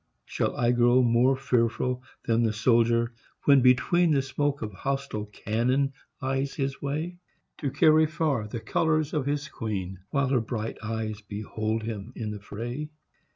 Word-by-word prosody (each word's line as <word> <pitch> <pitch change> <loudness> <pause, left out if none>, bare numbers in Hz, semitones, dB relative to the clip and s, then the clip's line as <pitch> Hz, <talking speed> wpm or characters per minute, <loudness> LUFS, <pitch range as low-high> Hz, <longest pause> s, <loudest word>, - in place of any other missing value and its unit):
Shall - - -2
I 120 0 +3
grow 120 +1 +4
More 120 +3 +4
fearful 125 -1 0 0.2
than 115 0 +2
the 110 -2 +2
soldier, 115 +1 +3 0.3
when 140 -2 +6
between 130 +8 +4
The 140 -3 +3
smoke 140 0 -1
of 105 -1 -5
hostile 135 -2 -3
cannon 125 +6 0 0.3
lies 135 +1 -1
his 135 0 -2
way; 155 +5 -3 0.4
To 145 - -1
carry 155 +3 +5
far 150 -8 -1
the 110 +2 -5
colours 155 +6 +1
of 145 -3 -1
his 145 +1 -1
queen, 95 - -4
While 140 -2 +1
her 130 -3 +3
bright 110 -1 -4
eyes 110 -1 -3
behold 110 +1 -3
him 110 +1 -5
in 110 -3 -4
the 105 - -6
fray? 120 +9 -5
125 Hz, 155 wpm, -27 LUFS, 110-140 Hz, 0.4 s, when